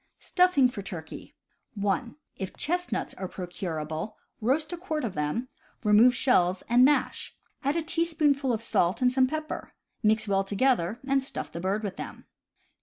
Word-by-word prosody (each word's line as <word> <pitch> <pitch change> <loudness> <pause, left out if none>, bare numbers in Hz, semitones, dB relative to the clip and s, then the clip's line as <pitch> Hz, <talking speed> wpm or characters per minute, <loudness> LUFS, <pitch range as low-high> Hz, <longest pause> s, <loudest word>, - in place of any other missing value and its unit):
Stuffing 360 -8 +3
for 240 -5 -6
Turkey. 175 -5 -8 0.2
— - - -46
(1) 205 +4 -1 0.2
If 190 -2 -6
chestnuts 355 +3 -2
are 190 - -5
procurable, 175 -1 -5 0.2
roast 295 +9 +1
a - - -3
quart 325 -4 -3
of 210 - -3
them, 150 +12 -2 0.4
remove 220 +4 +6
shells, 185 -9 +2
and 240 +2 +5
mash. 290 +2 +1 0.3
Add 280 +3 +1
a 330 - 0
teaspoonful 310 -5 +1
of 230 -1 -2
salt, 185 +1 +1
and 250 0 +4
some 260 0 +4
pepper. 310 +2 -5 0.3
Mix 220 0 +2
well 195 -1 +2
together, 210 0 +1
and 270 -1 +2
stuff 265 - -6
the 170 - -6
bird 195 +4 -1
with 200 -2 -4
them. - - -8
235 Hz, 165 wpm, -28 LUFS, 195-280 Hz, 0.4 s, remove